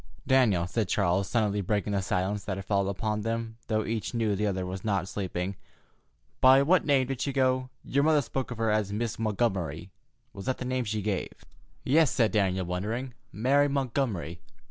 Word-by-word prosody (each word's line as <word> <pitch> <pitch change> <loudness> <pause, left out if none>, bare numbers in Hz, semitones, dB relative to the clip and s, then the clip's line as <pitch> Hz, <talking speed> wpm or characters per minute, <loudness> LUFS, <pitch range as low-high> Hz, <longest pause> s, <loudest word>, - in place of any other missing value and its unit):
"Daniel," 125 -10 +3
said 105 +3 -1
Charles, 95 0 +1
suddenly 105 -3 +1
breaking 105 +1 -1
the 100 - +1
silence 95 +2 -1
that 95 -2 -3
had 95 - -6
fallen 100 -1 +1
upon 105 +2 -2
them, 115 +1 -3
though 110 -1 0
each 115 +2 -3
knew 110 -3 +1
the 105 +2 0
other 95 -2 -1
was 95 +1 -5
not 95 -4 0
sleeping, 95 -1 -3 0.8
"by 130 +1 +7
what 175 +5 +4
name 140 -3 +3
did 130 -1 -4
she 140 - 0
go? 130 -1 +1 0.2
Your 140 +2 +1
mother 150 -2 +4
spoke 130 +2 -3
of 120 - -6
her 115 -1 +1
as 105 -2 0
Miss 115 +2 -3
Montgomery. 95 -7 -1 0.4
Was 100 -3 -8
that 130 - 0
the 125 - -5
name 130 -1 -1
she 105 -1 -2
gave?" 100 -2 -3 0.4
"Yes," 155 +2 +4
said 120 -5 +2
Daniel, 95 -3 +1
wondering; 110 +9 -3 0.2
"Mary 135 +7 +3
Montgomery." 125 - -2
110 Hz, 190 wpm, -28 LUFS, 95-130 Hz, 0.8 s, by